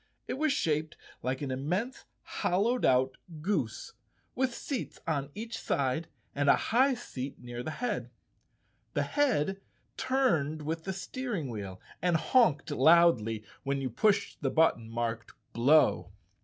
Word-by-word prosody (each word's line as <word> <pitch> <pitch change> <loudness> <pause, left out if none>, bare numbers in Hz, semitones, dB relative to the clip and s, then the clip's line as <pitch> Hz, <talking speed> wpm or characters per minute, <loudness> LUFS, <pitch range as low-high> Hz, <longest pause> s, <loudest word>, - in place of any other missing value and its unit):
It - - -2
was 310 -1 +2
shaped 155 - 0 0.2
like 130 +3 -2
an 135 - -3
immense 180 - -2 0.2
hollowed 220 +8 0
out 130 +1 +3 0.2
goose, 210 - -2 0.4
with 260 -1 0
seats 270 -5 -4
on 145 -3 -1
each 225 +2 -5
side 140 +4 -1 0.3
and 145 0 +1
a - - +8
high 260 +3 +2
seat 140 - -6
near 120 0 -7
the 140 - -4
head. 245 +10 -3 0.9
The - - +2
head 195 - +1 0.4
turned 160 - +1
with 160 +2 -3
the 190 - -1
steer¬ 240 +4 -4
ing 145 -6 -4
wheel 100 -4 -6 0.2
and 175 0 +3
honked 165 - +3
loudly 135 -8 +4 0.2
when 140 0 -1
you 130 -2 -3
pushed 205 - +1
the 135 - +1
but¬ 160 +5 +4
ton 115 -1 -12
marked 115 -1 -3
" - - -43
Blow." 140 0 +4
155 Hz, 150 wpm, -30 LUFS, 130-215 Hz, 0.9 s, a